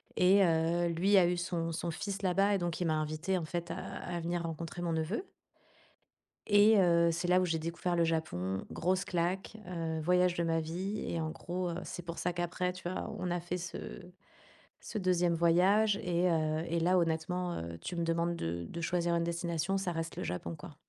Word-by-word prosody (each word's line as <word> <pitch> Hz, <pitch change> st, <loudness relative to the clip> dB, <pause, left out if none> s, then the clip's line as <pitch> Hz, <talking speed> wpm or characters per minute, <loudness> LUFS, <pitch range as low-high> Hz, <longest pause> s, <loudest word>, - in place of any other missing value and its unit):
et 195 Hz, +2 st, +5 dB
heu, 170 Hz, 0 st, +2 dB
lui 180 Hz, +4 st, +3 dB
a 180 Hz, -2 st, +6 dB
eu 175 Hz, 0 st, 0 dB
son 175 Hz, -1 st, -2 dB
son 170 Hz, +1 st, -2 dB
fils 200 Hz, +4 st, -4 dB
là-bas 195 Hz, +2 st, +3 dB
et -, -, +2 dB
donc 175 Hz, -2 st, -3 dB
il -, -, +1 dB
m'a 155 Hz, -, +2 dB
invitée, 155 Hz, +5 st, -1 dB
en 170 Hz, -, -3 dB
fait, 170 Hz, +1 st, -4 dB
à -, -, -4 dB
à 175 Hz, -1 st, -5 dB
venir 170 Hz, +1 st, -2 dB
rencontrer 165 Hz, +1 st, -5 dB
mon 170 Hz, -1 st, -1 dB
neveu 165 Hz, -, -2 dB, 1.2 s
et 210 Hz, +1 st, +6 dB
heu, 170 Hz, -2 st, +4 dB
c'est 175 Hz, +2 st, -2 dB
là 180 Hz, +1 st, +5 dB
où 185 Hz, -, +2 dB
j'ai 165 Hz, -2 st, 0 dB
découvert 170 Hz, +2 st, -2 dB
le 170 Hz, -, +3 dB
Japon. 95 Hz, -, -1 dB
Grosse 185 Hz, +3 st, 0 dB
claque, 185 Hz, +4 st, -1 dB
heu, 165 Hz, -3 st, -3 dB
voyage 180 Hz, +2 st, +3 dB
de 170 Hz, -, 0 dB
ma 165 Hz, -1 st, +1 dB
vie 180 Hz, +6 st, -3 dB
et 170 Hz, -, -2 dB
en 160 Hz, -, -2 dB
gros, 175 Hz, +3 st, -3 dB
heu 170 Hz, -, -3 dB
c'est 175 Hz, -, -7 dB
pour 170 Hz, 0 st, -5 dB
ça 180 Hz, -, -1 dB
qu'après, 175 Hz, +1 st, -1 dB
tu 180 Hz, -1 st, -5 dB
vois? 185 Hz, -, -4 dB
On 180 Hz, -, -2 dB
a 175 Hz, -, 0 dB
fait 175 Hz, +1 st, -3 dB
ce 170 Hz, -1 st, -5 dB, 1.0 s
ce 215 Hz, -, -4 dB
2e 180 Hz, -2 st, +2 dB
voyage 185 Hz, +6 st, +4 dB
et 175 Hz, 0 st, +2 dB
heu, 155 Hz, -1 st, +1 dB
et 170 Hz, +1 st, 0 dB
là 180 Hz, +3 st, +3 dB
honnêtement, 170 Hz, +2 st, -1 dB
heu, 85 Hz, 0 st, -6 dB
tu 175 Hz, -, -5 dB
me 170 Hz, -, -1 dB
demandes 170 Hz, +1 st, 0 dB
de 85 Hz, -, -3 dB
de 170 Hz, -, -5 dB
choisir 170 Hz, 0 st, +1 dB
une 170 Hz, -, +1 dB
destination, 170 Hz, +2 st, -1 dB
ça 190 Hz, -2 st, -1 dB
reste 165 Hz, 0 st, -4 dB
le -, -, -3 dB
Japon 85 Hz, -1 st, -4 dB
quoi. -, -, -11 dB
170 Hz, 215 wpm, -32 LUFS, 165-180 Hz, 1.2 s, a